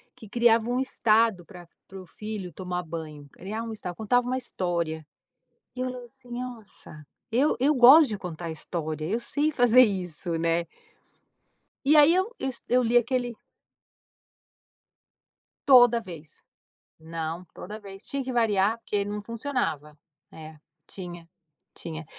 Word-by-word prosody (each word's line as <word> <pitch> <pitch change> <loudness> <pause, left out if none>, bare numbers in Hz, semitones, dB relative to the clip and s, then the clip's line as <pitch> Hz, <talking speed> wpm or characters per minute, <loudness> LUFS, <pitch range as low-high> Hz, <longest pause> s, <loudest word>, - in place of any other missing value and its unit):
que 220 - -13
criava 235 0 +3
um 250 +1 0
estado 225 -7 +2
para 180 -3 -13 0.2
para 190 0 -10
o - - -13
filho 205 0 -7
tomar 180 0 -4
banho, 155 -3 -8
criava 215 +5 -6
um 225 - -5
estado, 180 -5 -6
contava 245 +4 +1
uma 255 +1 0
história. 170 -9 -3 0.7
E - - -5
eu 255 - -1
lembro 250 -1 -6
assim, 250 +1 -11
nossa, 230 -11 -9 0.3
eu 260 +6 +2
eu 285 +4 +3
gosto 270 +5 +8
de 210 -2 -4
contar 170 -2 -6
história, 155 -1 -5
eu 220 +6 0
sei 295 +5 0
fazer 245 -3 +5
isso, 180 -5 -1
né. 165 +1 +1 1.2
E 300 +2 +6
aí 300 +3 +7
eu 380 +6 0
s, 260 -3 -4
eu 250 +1 +3
li 240 +1 +1
aquele 245 0 +1 2.3
Toda 245 -3 +7
vez. 165 -7 -12 0.6
Não, 165 +2 -5
toda 210 +3 -8
vez, 195 0 -12
tinha 275 -1 -3
que 260 - -4
variar 220 -2 +2
porque 205 -3 -2
não 205 +1 -5
funcionava. 210 - -3 0.3
É, 160 0 -11 0.3
tinha, 175 -3 -9 0.5
tinha. 160 -1 -7
215 Hz, 145 wpm, -26 LUFS, 170-245 Hz, 2.3 s, gosto